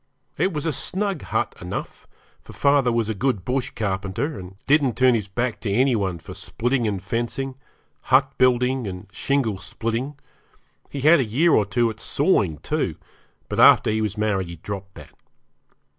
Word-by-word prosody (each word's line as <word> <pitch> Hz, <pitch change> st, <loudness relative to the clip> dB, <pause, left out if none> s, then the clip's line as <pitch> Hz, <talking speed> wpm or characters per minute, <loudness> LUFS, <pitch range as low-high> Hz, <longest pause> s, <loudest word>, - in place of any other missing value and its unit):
It 185 Hz, +6 st, +1 dB
was 150 Hz, -3 st, -3 dB
a 160 Hz, -, 0 dB
snug 195 Hz, +4 st, -2 dB
hut -, -, -1 dB
enough, -, -, -6 dB, 0.3 s
for -, -, -13 dB
father 140 Hz, -3 st, +3 dB
was 115 Hz, -2 st, 0 dB
a 110 Hz, -, -1 dB
good 110 Hz, -3 st, -1 dB
bush 130 Hz, 0 st, -1 dB
carpenter, 105 Hz, +7 st, -2 dB
and 90 Hz, +1 st, -10 dB
didn't 140 Hz, -6 st, +3 dB
turn 130 Hz, -1 st, +5 dB
his 105 Hz, -4 st, -1 dB
back 120 Hz, +4 st, -2 dB
to 105 Hz, -, -3 dB
any 125 Hz, +4 st, +3 dB
one 95 Hz, -5 st, -1 dB
for 80 Hz, -, -10 dB
splitting 120 Hz, +1 st, -1 dB
and 100 Hz, -2 st, -1 dB
fencing, 120 Hz, +7 st, -3 dB, 0.5 s
hut 135 Hz, +1 st, +3 dB
building 125 Hz, -1 st, +2 dB
and 90 Hz, 0 st, -6 dB
shingle 120 Hz, -5 st, 0 dB
splitting; 115 Hz, +8 st, -3 dB, 0.7 s
he 140 Hz, -, -5 dB
had 155 Hz, +4 st, +6 dB
had 170 Hz, -, +7 dB
a -, -, +3 dB
year 145 Hz, +11 st, +2 dB
or 105 Hz, -7 st, +3 dB
two 115 Hz, +2 st, +1 dB
at 110 Hz, -, -12 dB
sawing, 105 Hz, -, +1 dB
too, -, -, -1 dB, 0.5 s
but -, -, -3 dB
after -, -, +7 dB
he 110 Hz, 0 st, 0 dB
was 105 Hz, -1 st, -2 dB
married 105 Hz, -4 st, 0 dB
he 85 Hz, -, -7 dB
dropped 95 Hz, +3 st, -7 dB
that. -, -, -13 dB
120 Hz, 180 wpm, -23 LUFS, 100-135 Hz, 0.7 s, had